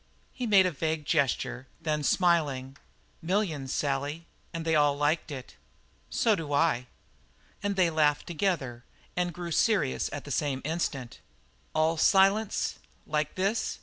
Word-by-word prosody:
He 250 -2 -3
made 195 -3 +6
a 185 - +1
vague 155 0 -2
gesture 135 -3 0
and 165 - -25
then, 150 -1 0
smiling: 145 -6 +1 0.4
"Millions, 165 -7 -1
Sally, 145 +3 -2 0.3
and 165 -1 -5
they 160 - +1
all 145 -2 +4
liked 150 +3 +1
it." 135 -3 -8 0.5
"So 225 -3 +3
do 155 -5 -4
I." 140 -5 +2 0.7
And 205 -1 -1
they 180 -3 +3
laughed 150 -2 +2
together, 155 -9 -2 0.3
and 175 0 0
grew 175 +1 -6
serious 165 - +2
at 145 - -5
the 145 - -8
same 140 -1 -1
instant. 145 -6 -3 0.6
"All 160 +1 +2
silence 195 +5 +3 0.3
like 150 0 -1
this?" 200 +4 0
155 Hz, 145 wpm, -28 LUFS, 145-180 Hz, 0.7 s, made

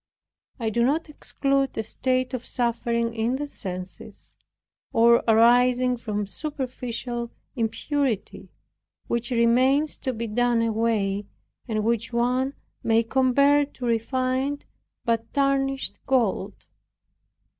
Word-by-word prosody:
I 225 -2 -1
do 235 +2 +2
not 305 +6 +1
exclude 275 -2 -1
a 220 - 0
state 255 +3 -1
of 250 -2 -3
suffering 235 -1 -1
in 230 +2 0
the 290 +2 -3
senses, 185 -9 -8 0.6
or 235 +1 +5
arising 245 +2 +5
from 210 -3 -3
superficial 245 -2 -5 0.3
impurity, 245 0 -2 0.6
which 235 0 -2
remains 255 +5 +3
to 260 - -2
be 230 -1 -4
done 235 +1 +1
away, 215 -3 0 0.4
and 215 -2 -1
which 230 +1 0
one 250 +3 0 0.3
may 225 0 +3
compare 270 +4 +3
to 275 -3 -7
refined 255 +4 -1 0.4
but 230 -1 0
tarnished 275 -1 0
gold. 220 -6 +1
240 Hz, 110 wpm, -25 LUFS, 230-265 Hz, 0.6 s, or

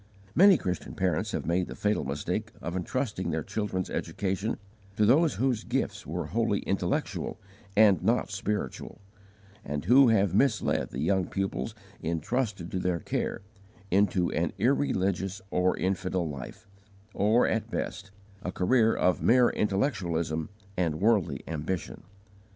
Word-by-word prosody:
Many 190 +2 +7
Christian 90 - -4
parents 90 -5 0
have - - -3
made 90 +2 +1
the - - -7
fatal 105 0 0
mistake 70 +2 -3
of 85 - -5
intrusting 105 +2 -2
their 80 -1 -1
children's 100 -2 -2
education 100 +2 -2 0.4
to 105 - +4
those 150 +8 +4
whose 125 -4 0
gifts - - -2
were - - -3
wholly - - 0
intellectual - - -2 0.4
and 105 -5 +6
not - - +1
spiritual, 105 0 -3 0.6
and 75 +1 -4
who 130 +6 +7
have 100 -5 +3
misled 115 +1 +2
the 65 - -5
young 90 +3 +1
pupils 95 +3 -3 0.3
entrusted 90 - -2
to 95 - -1
their 90 -2 0
care, 80 - -2 0.5
into 95 -2 +2
an 80 -1 -1
irreligious 95 -6 +1
or 90 +1 +2
infidel 95 -2 -1
life, 70 -4 -8 0.5
or, 110 +4 +3
at 110 0 -1
best, 100 -2 -4 0.3
a 90 - -3
career 115 +5 +3
of 90 0 +2
mere 125 0 +5
intellectualism 85 - -1 0.3
and 80 -4 0
worldly 105 -3 +2
ambition. 80 +1 -4
95 Hz, 135 wpm, -28 LUFS, 90-110 Hz, 0.6 s, Many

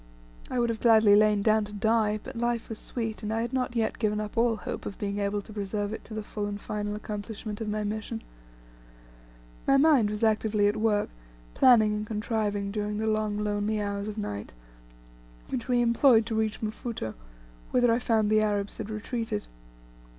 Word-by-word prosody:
I - - -2
would 235 -2 0
gladly 220 -3 +6
have 205 - +8
lain 210 -1 +3
down 215 0 +4
to 210 - -10
die, 215 0 +1
but - - -8
life 235 0 -1
was 225 - -5
sweet, 225 -3 -4
and 210 -1 -3
I 225 +1 0
had 240 +2 -3
not 250 -2 -1
yet 225 -1 0
given 210 -2 +1
up 210 -1 -5
all 230 0 +3
hope 205 - -6
of 200 - -7
being 200 0 -3
able 200 0 -1
to 215 - -12
preserve 205 0 -3
it - - -6
to 220 - -8
the 215 - -3
full 205 0 -4
and 205 0 -4
final 210 0 -3
accomplishment 210 +1 -6
of 220 - -2
my 210 0 -1
mission. 220 +2 -4 1.4
My 275 - +5
mind 275 -7 +5
was 210 +2 -3
actively 215 -1 +2
at 205 +1 +2
work 215 -1 +1 0.4
planning 220 -4 +5
and 210 0 -3
contriving 210 -2 -1
during 210 0 -2
the 220 - -1
long 215 -1 0
lonely 210 +1 -1
hours 200 0 -2
of 215 0 -5
night, 105 - -5 1.0
which 255 -2 -3
we 245 -1 +3
employed 235 -1 +5
to 225 0 -3
reach 220 -1 -1
Mfuto, 215 - -4 0.6
whither 245 -2 +3
I 235 - +2
found 220 -3 +1
the 215 0 +5
Arabs 205 -1 -1
had 220 -1 -5
retreated. 225 - -3
215 Hz, 195 wpm, -28 LUFS, 205-225 Hz, 1.4 s, have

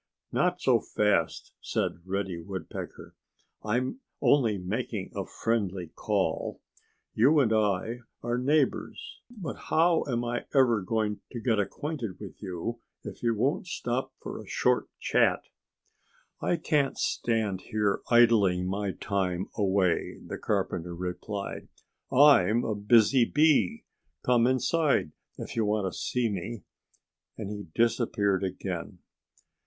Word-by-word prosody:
"Not 180 0 +1
so 125 -3 +4
fast!" 105 -1 0
said - - -2
Reddy 95 -3 -2
Woodpecker. 95 -2 -7 0.5
"I'm 125 - -1 0.2
only 115 -8 +3
making 100 +2 -3
a - - -3
friendly 100 -7 -2
call. - - -1 0.5
You 140 +7 +5
and 115 -5 +3
I 110 +2 +1 0.2
are 120 +1 0
neighbors. 155 - 0
But 200 - -7
how 165 +1 +4
am 120 -2 -1
I 120 +1 -2
ever 120 -6 +4
going 105 +1 -1
to 120 - -4
get 110 -2 +1
acquainted 120 - -3
with 100 -3 -10
you 100 +4 -4 0.2
if - - -8
you 115 -1 +1
won't 145 - 0
stop 125 -6 -2
for - - -7
a - - -13
short - - +1
chat?" - - +2 1.0
"I - - +1
can't 145 -4 +1
stand 110 -5 0
here 105 -2 +1
idling 110 -7 +5
my 100 +1 -2
time 95 -2 -2
away," 95 -4 +1
the - - -6
carpenter 85 +1 -2
replied. 90 +3 -5 0.4
"I'm 120 -6 +6
a 110 - -1
busy 110 +4 +4
bee. 150 - +3 0.4
Come 120 -1 +4
inside 135 - +2 0.3
if - - -7
you 115 - +2
want 105 -3 0
to - - -8
see 125 -2 0
me!" 100 0 -4 0.7
And 105 -2 -5
he 105 -2 -6
disappeared 105 -4 +1
again. 95 -1 -4
110 Hz, 125 wpm, -28 LUFS, 95-125 Hz, 1.0 s, I'm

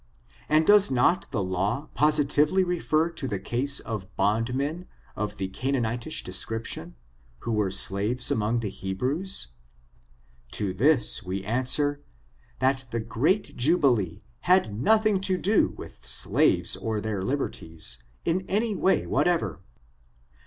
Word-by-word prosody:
And 155 +1 +3
does 205 +1 +6
not 135 +8 +1
the 105 -7 -2
law 100 +10 -2
positively 150 +4 +3
refer 170 -2 0
to 150 -5 -4
the 105 -5 -2
case 125 +7 0
of 95 -4 -7
bondmen 125 - -1 0.3
of 105 0 -4
the 95 - -3
Canaanitish 120 +5 -1
description, 95 -2 -3 0.5
who 115 - -4
were 105 -3 +1
slaves 100 +5 +2
among 110 +2 0
the 105 - -3
Hebrews? 125 - -3 1.0
To 100 -3 0
this 125 +3 +3
wc 95 -2 -5
answer, 130 +5 0 0.6
that 130 0 0
the 115 - -3
great 125 - -1
jubilee 120 - +2 0.3
had 180 - +4
nothing 215 - +2
to 190 -1 0
do 205 +4 +3
with - - -11
slaves - - +3
or 110 -1 -3
their 105 -3 -3
liberties, 80 - -1 0.2
in 180 +3 0
any 215 +2 0
way 190 +1 +1
whatever. 175 - 0
125 Hz, 125 wpm, -26 LUFS, 105-155 Hz, 1.0 s, does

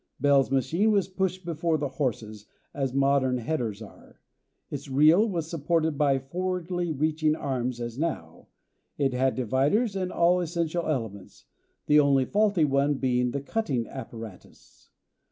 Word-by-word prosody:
Bell's 140 -2 +3
machine 160 - +1
was 200 -4 +2
pushed 185 -1 -2
before 165 -1 0
the 145 -1 -2
horses, 110 -5 -3 0.3
as 135 -3 -2
modern 135 -1 +2
headers 115 -5 -3
are. 105 - -16 0.5
Its - - -6
reel 155 +11 +5
was 170 -5 -3
supported 160 -1 0
by 140 -1 +2
forwardly 175 +4 -3
reaching 155 +1 +1
arms 125 -4 -3
as 120 +1 -5
now; 165 -1 -4 0.5
it 135 -3 +1
had 130 +1 +1
dividers 140 - +1
and 185 -1 -2
all 175 +1 +3
essential 170 0 -2
elements, 110 -10 -5 0.4
the 150 0 +5
only 140 -2 +3
faulty 205 -2 +2
one 140 +1 +1
being 125 -2 0
the 140 +3 -3
cutting 140 - -2
apparatus. 115 -7 -11
145 Hz, 140 wpm, -27 LUFS, 130-170 Hz, 0.5 s, reel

